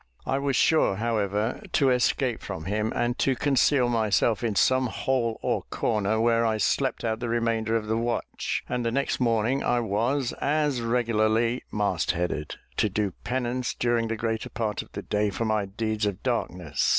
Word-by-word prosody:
I 135 - 0
was 140 -1 0
sure, 155 -8 +3
however, 105 - -1
to 135 -4 +4
escape 125 0 +1
from 95 -5 -6
him, 105 +3 -1
and 120 +1 0
to 135 - +2
conceal 135 0 +3
myself 110 -1 +1
in 110 -3 0
some 130 +4 +3
hole 120 -1 -1
or - - 0
corner, 110 -1 0
where 115 0 +3
I 110 -1 +1
slept 135 +4 0
out 110 -1 -1
the 120 - -3
remainder 115 -1 0
of 110 -2 0
the 110 +1 0
watch; 120 0 -2
and 125 -1 -2
the 115 - +1
next 140 +4 -1
morning, 120 +2 +1
I 120 - +2
was, 120 +5 0
as 145 -3 +1
regularly, 115 0 +1
mast 100 -7 0
headed, 85 -3 -3 0.2
to 105 - +2
do 100 0 -1
penance 125 0 -2
during 120 -1 +1
the 115 - -2
greater 110 0 -2
part 110 -2 -2
of - - -15
the - - -5
day 105 0 0
for 110 +4 -3
my 110 -2 0
deeds 110 +1 -1
of 100 -1 -4
darkness. 90 - -1
115 Hz, 180 wpm, -26 LUFS, 105-125 Hz, 0.2 s, to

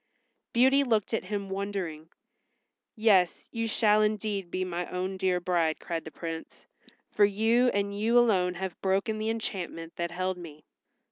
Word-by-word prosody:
Beauty 265 +4 +4
looked 225 -5 0
at 225 - -1
him 200 0 -3
wondering. 190 -5 -4 0.9
"Yes, 200 -6 +3
you 230 0 -2
shall 215 -1 +3
indeed 210 -3 -1
be 185 +1 -2
my 175 -1 -3
own 185 +1 -3
dear 185 -1 +1
bride," 170 -3 0
cried 165 -2 -4
the - - -6
Prince, 165 0 -7 0.5
"for 210 - +3
you 225 +5 +3
and 200 -3 0
you 225 +4 +2
alone 190 -7 +3
have 185 -1 -5
broken 195 +3 0
the 215 +1 -1
enchantment 185 -7 -4
that 170 0 -2
held 185 +1 -2
me." 155 -4 -11
195 Hz, 155 wpm, -28 LUFS, 180-215 Hz, 0.9 s, Beauty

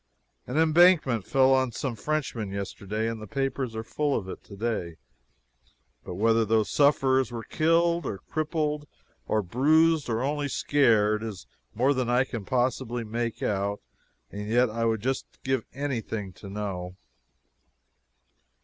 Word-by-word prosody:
An 125 - -3
embankment 160 - +4
fell 135 0 +4
on 130 -2 +2
some 125 +1 -3
Frenchmen 125 -6 -2
yesterday, 100 +2 -3
and 115 -1 -4
the 110 - -8
papers 135 -1 -2
are 110 - -3
full 145 +4 -1
of 95 - -5
it - - -8
today 100 -5 -3 1.1
but 90 - -7
whether 115 +3 +3
those 110 0 +1
sufferers 135 -4 +3
were 115 -1 -5
killed, 170 +3 +2
or 100 - -3
crippled, 150 - -2 0.4
or 110 -1 +1
bruised, 155 - +3
or 115 +2 0
only 145 +1 -1
scared 110 -7 +2
is 105 - -6 0.3
more 130 +6 +3
than 130 -3 -1
I 125 +1 +4
can 115 -6 -6
possibly 125 -1 -1
make 115 +1 -3
out, 100 0 -1 0.5
and 105 +1 -6
yet 120 +1 +3
I 115 +1 -1
would 110 -2 +1
just 130 +3 -2 0.2
give 130 -3 0
anything 115 -8 -4
to 100 - -11
know. 95 -3 -5
120 Hz, 145 wpm, -27 LUFS, 110-140 Hz, 1.1 s, embankment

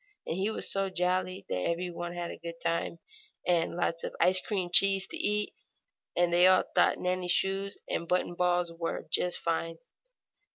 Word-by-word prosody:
And - - -3
he 195 +3 0
was 220 - +1
so 195 0 +1
jolly 185 +1 -1
that 90 - -2
every 175 - -2
one 175 0 -6
had 175 -1 -5
a - - -9
good 170 0 -8
time 170 0 -2 0.5
and 170 -2 +1
lots 170 -1 -2
of - - -5
ice 185 +1 +4
cream 185 -5 -3
cheese 195 0 +7
to - - -6
eat, 210 0 0 0.6
and 175 -1 +2
they 175 +1 +6
all 185 0 +5
thought - - +3
Nannie's 180 0 -2
shoes, 195 +2 -1
and - - -2
the 170 - -11
button 180 0 0
ball 180 0 +1
buttons, 170 -1 -11
were 165 - -4
just 180 0 +1
fine. 165 0 -2
180 Hz, 195 wpm, -29 LUFS, 170-185 Hz, 0.6 s, cheese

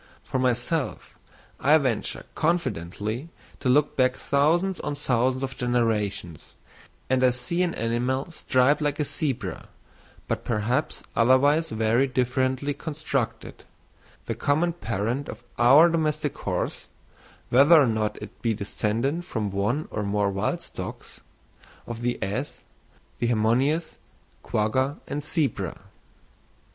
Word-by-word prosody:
For 130 - -2
myself, 130 +4 -1 0.4
I 150 +3 +5
venture 130 -7 -2
confidently 120 - -2 0.3
to 130 - -1
look 145 +3 +3
back 130 -1 +3
thousands 170 +6 +1
on 145 -1 -3
thousands 130 -1 0
of 130 -1 -3
generations, 110 - -1 0.5
and 130 0 +2
I 130 - +6
see 150 +9 -1
an 175 -2 0
animal 125 +6 -1
striped 140 -1 +2
like 145 0 -1
a 150 - +1
zebra, 140 -3 -3 0.6
but - - -2
perhaps 120 +6 -1
otherwise 145 +7 +4
very 115 +3 +2
differently 130 +2 0
constructed, 145 -5 -4 0.6
the - - -2
common 165 +4 +1
parent 120 - -2
of - - -8 0.2
our 135 +8 +8
domestic 155 -3 0
horse - - -3 0.6
(whether 145 +6 +7
or 145 - +5
not 110 -2 -1
it - - -12
be 115 -2 +1
descended 115 +9 -1
from 105 - -3
one 105 +10 -1
or 105 - -2
more 100 0 0
wild 95 0 -1
stocks) - - -8 0.7
of 120 -1 -6
the 120 0 0
ass, 115 +10 -4 0.6
the 120 - +1
hemionus, 125 +8 +1 0.4
quagga, 130 +7 0
and 145 - -4
zebra. 140 - -1
130 Hz, 125 wpm, -25 LUFS, 115-145 Hz, 0.7 s, our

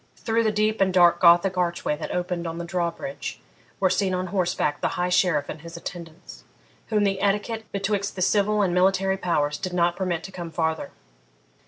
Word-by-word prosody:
Through 230 0 0
the 220 - +2
deep 215 0 0
and 190 -1 +3
dark 175 -1 +5
Gothic 175 +2 +5
archway 170 -3 0
that 155 - -5
opened 175 -1 -2
on 165 0 -5
the 170 - -4
drawbridge 175 +10 -4 0.4
were 190 -2 +3
seen 190 -1 +1
on 185 0 -2
horseback 175 -6 0
the - - +2
High 180 0 0
Sheriff 175 -5 +2
and 150 - -7
his 170 +1 -9
attendants, 170 -1 -9 0.4
whom 210 -2 +1
the 195 -1 0
etiquette 210 +2 -1
betwixt 200 0 -2
the 185 - -1
civil 210 +2 +2
and 180 -3 0
military 190 +1 +2
powers 150 -6 0
did 185 -2 -4
not 175 -1 +2
permit 175 -3 -2
to 195 - -8
come 175 -3 -6
farther. 160 0 -2
180 Hz, 190 wpm, -24 LUFS, 170-195 Hz, 0.4 s, dark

